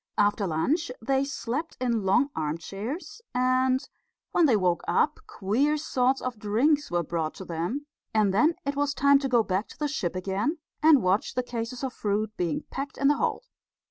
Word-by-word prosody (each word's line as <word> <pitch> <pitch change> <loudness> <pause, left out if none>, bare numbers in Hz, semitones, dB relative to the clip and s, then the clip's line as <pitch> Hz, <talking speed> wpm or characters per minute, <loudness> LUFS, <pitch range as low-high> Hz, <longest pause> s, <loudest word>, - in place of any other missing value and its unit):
After 205 -1 +2
lunch 255 - 0
they 265 +4 +1
slept 275 +3 -4
in 235 -4 0
long 225 +9 +3
armchairs, 200 - -4
and 255 +1 +2 0.4
when 340 -3 +4
they 235 -6 +4
woke 180 -3 +1
up - - +2
queer 265 +10 +1
sorts 265 -3 +1
of 250 -4 -4
drinks 255 +9 +2
were 175 0 0
brought 160 -1 -2
to 190 - -8
them; 175 - -3 0.3
and 215 -4 +2
then 305 - +4
it 280 0 -1
was 290 0 0
time 280 0 +5
to 275 -1 -2
go 240 -3 +4
back 190 +1 -1
to - - -14
the 300 - -1
ship 225 - -2
again 195 - -1 0.2
and 305 -6 +6
watch 185 +3 +1
the 250 - +1
cases 240 +1 -5
of 260 -2 -2
fruit 215 +1 -1
being 170 -4 -1
packed 280 +3 -5
in 275 - +3
the 290 - +3
hold. - - -1
245 Hz, 185 wpm, -27 LUFS, 195-280 Hz, 0.4 s, and